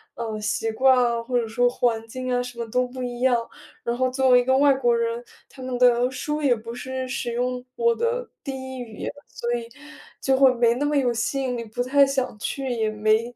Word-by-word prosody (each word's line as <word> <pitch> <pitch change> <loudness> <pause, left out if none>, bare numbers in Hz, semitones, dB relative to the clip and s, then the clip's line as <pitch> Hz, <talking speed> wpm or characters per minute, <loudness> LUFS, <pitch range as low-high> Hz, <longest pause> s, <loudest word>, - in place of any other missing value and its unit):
呃， 225 -2 -4
习 220 +1 -1
惯 260 +4 +4
啊， 235 -2 +2
或 245 +1 -1
者 235 - -1
说 245 +3 +2
环 230 -2 0
境 255 +2 -4
啊， 245 - +2
什 245 -1 -8
么 235 - -3
都 250 +1 +1
不 255 +1 -7
一 245 -1 -5
样。 255 -2 +4 0.5
然 235 - -1
后 255 0 +2
作 260 +1 +1
为 250 -1 +7
一 245 - -1
个 260 +1 +3
外 280 0 +5
国 245 -3 +2
人， 230 0 -1 0.3
他 265 - -13
们 255 -1 -3
的 245 0 +4
书 300 +4 -3
也 270 -4 +3
不 230 +1 -8
是 260 +1 -4
使 240 -2 -3
用 250 +1 -2
我 470 0 +3
的 475 +1 -1 0.2
第 275 - -3 0.2
1 - - -7
语 230 -3 -8
言， - - -4 0.2
所 240 0 -3
以 235 -1 -3 0.5
就 265 -1 +2
会 265 -1 +6
没 235 -1 +3
那 280 +4 -1
么 295 0 0
有 255 -4 +2
吸 235 +4 -1
引 250 -2 -2
力， 230 - -5
不 225 +3 -3
太 280 +2 +5
想 260 -4 -2
去， 270 +5 -3
也 225 -3 0
没， 215 +3 +1
245 Hz, 250 characters per minute, -24 LUFS, 235-260 Hz, 0.5 s, 为